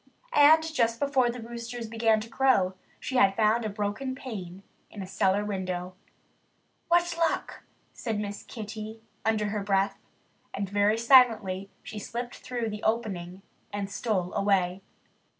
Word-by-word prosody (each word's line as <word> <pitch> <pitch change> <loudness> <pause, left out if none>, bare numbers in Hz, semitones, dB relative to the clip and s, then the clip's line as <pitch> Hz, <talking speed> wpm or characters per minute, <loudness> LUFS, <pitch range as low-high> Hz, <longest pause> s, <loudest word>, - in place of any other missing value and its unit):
And 310 +2 +7
just 235 -8 0
before 275 -4 +2
the 245 +1 -5
roosters 235 0 -6
began 225 -1 +2
to 220 - -7
crow 230 -7 +3 0.3
she 260 - -2
had 195 -6 +5
found 220 +2 +3
a 215 - -1
broken 210 +6 -3
pane 195 -8 -7 0.3
in 205 - -7
a - - -6
cellar 195 +1 +1
window. 185 -2 -3 0.9
"What 345 0 +3
luck!" 330 -1 0 0.3
said 225 -4 -3
Miss 205 -1 -4
Kitty 220 0 -8 0.2
under 215 -1 +1
her 210 0 -2
breath. 195 0 +1 0.6
And 200 0 -2
very 205 +2 +2
silently 225 -6 +4
she 215 - -7
slipped 240 +4 -5
through 240 -3 -3
the 210 0 -6
opening 195 -5 -2 0.3
and 200 -1 -4
stole 195 -6 -1
away. 190 -2 +1
215 Hz, 145 wpm, -28 LUFS, 195-240 Hz, 0.9 s, And